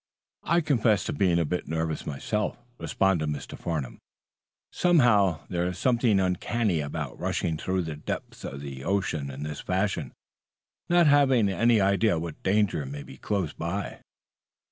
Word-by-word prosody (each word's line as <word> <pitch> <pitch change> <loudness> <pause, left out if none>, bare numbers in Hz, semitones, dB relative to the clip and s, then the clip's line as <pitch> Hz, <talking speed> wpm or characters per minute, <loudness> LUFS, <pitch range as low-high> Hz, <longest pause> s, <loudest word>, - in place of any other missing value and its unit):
"I'll 170 0 +2
confess 115 -9 +2
to - - -3
being 90 -4 +2
a 85 - +2
bit 90 +4 -3
nervous 80 0 -2
myself," 105 +9 -2 0.2
responded 95 -6 +1
Mr. 75 -2 -5
Farnum. 75 -7 -4 0.7
"Somehow, 120 - +4
there's 90 0 -2
something 120 -5 +3
uncanny 95 +1 0
about 70 -1 -4
rushing 80 - -1
through 95 +3 -1
the 80 -2 -5
depths 75 - -6
of 70 - -6
the 70 -2 -7
ocean 85 -7 -1
in 70 +2 -6
this 75 -1 -5
fashion, 95 -8 -1 0.8
not 175 0 +5
having 135 -7 +4
any 115 +3 +3
idea 100 0 +3
what 80 -1 -6
danger 100 -2 +2
you 70 - -5
may 70 0 -6
be - - -12
close 95 -7 -2
by." 95 +5 -4
95 Hz, 150 wpm, -27 LUFS, 80-105 Hz, 0.8 s, not